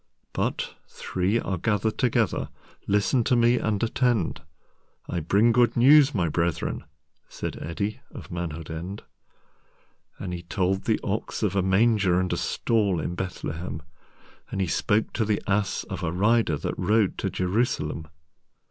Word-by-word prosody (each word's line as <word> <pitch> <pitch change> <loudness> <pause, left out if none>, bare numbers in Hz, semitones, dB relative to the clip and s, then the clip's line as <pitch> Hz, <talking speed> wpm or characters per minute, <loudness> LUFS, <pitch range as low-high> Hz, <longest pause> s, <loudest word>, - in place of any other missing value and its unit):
"But—three 95 +5 -2
are 95 -5 -3
gathered 105 +1 0
together—Listen 115 -1 0
to 125 - +3
me 120 +1 +4
and 110 0 -1
attend.I 90 - -3
bring 100 +9 +3
good 120 0 +3
news, 140 +2 +6
my 90 -4 +1
brethren!"Said 80 -2 -4
Eddi 100 +7 -3
of - - -10
Manhood 85 -2 -5
End.And 90 +1 -11
he 85 - -5
told 95 +2 -1
the 110 - +2
Ox 105 +2 -3
of 100 -2 +1
a 100 - +3
MangerAnd 95 -2 +3
a - - -1
Stall 105 -6 +1
in 80 - -3
Bethlehem, 85 -3 -5 0.7
And - - -4
he 95 - +2
spoke 105 +5 0
to 115 - +1
the 105 -1 +1
Ass 100 0 0
of - - -6
a 80 - -1
Rider, 105 -2 +2
That - - -4
rode 105 -2 +2
to - - -1
Jerusalem. 90 -4 -1
100 Hz, 130 wpm, -26 LUFS, 90-110 Hz, 0.7 s, news